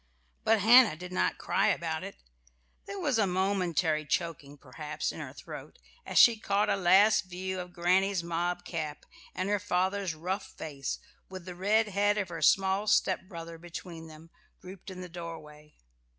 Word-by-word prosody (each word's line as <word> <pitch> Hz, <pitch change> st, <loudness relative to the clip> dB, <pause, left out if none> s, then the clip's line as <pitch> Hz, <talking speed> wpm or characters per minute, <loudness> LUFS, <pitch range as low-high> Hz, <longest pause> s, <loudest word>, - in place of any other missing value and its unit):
But 220 Hz, -1 st, +3 dB
Hannah 230 Hz, -2 st, +7 dB
did 180 Hz, +3 st, -9 dB
not 180 Hz, -, 0 dB
cry -, -, +1 dB
about -, -, -1 dB
it. -, -, -7 dB, 0.7 s
There 400 Hz, -, -6 dB
was 290 Hz, -10 st, +1 dB
a 205 Hz, -, +3 dB
momentary 180 Hz, -4 st, 0 dB
choking, 150 Hz, -2 st, -3 dB
perhaps, 150 Hz, +3 st, -5 dB
in -, -, -9 dB
her -, -, -6 dB
throat, -, -, -10 dB, 0.3 s
as -, -, -2 dB
she 230 Hz, -2 st, +7 dB
caught 205 Hz, 0 st, +1 dB
a -, -, +3 dB
last 195 Hz, +3 st, +5 dB
view 185 Hz, +1 st, -4 dB
of 180 Hz, 0 st, -7 dB
granny's 185 Hz, +1 st, +1 dB
mob 175 Hz, +1 st, -2 dB
cap 155 Hz, -4 st, -5 dB, 0.3 s
and 185 Hz, +1 st, -2 dB
her 205 Hz, 0 st, +1 dB
father's 190 Hz, -2 st, -1 dB
rough 185 Hz, +5 st, -4 dB
face, 140 Hz, -3 st, -4 dB, 0.3 s
with 185 Hz, -2 st, -9 dB
the 180 Hz, -, -7 dB
red 210 Hz, +4 st, +2 dB
head 205 Hz, +1 st, +2 dB
of 195 Hz, -4 st, -1 dB
her 170 Hz, -, -6 dB
small 195 Hz, +2 st, +3 dB
stepbrother 170 Hz, -5 st, 0 dB
between 170 Hz, -1 st, -9 dB
them, 160 Hz, +1 st, -14 dB, 0.3 s
grouped 185 Hz, +1 st, -11 dB
in 185 Hz, -1 st, -8 dB
the 180 Hz, -, -7 dB
doorway. 160 Hz, -3 st, -10 dB
180 Hz, 165 wpm, -30 LUFS, 165-200 Hz, 0.7 s, Hannah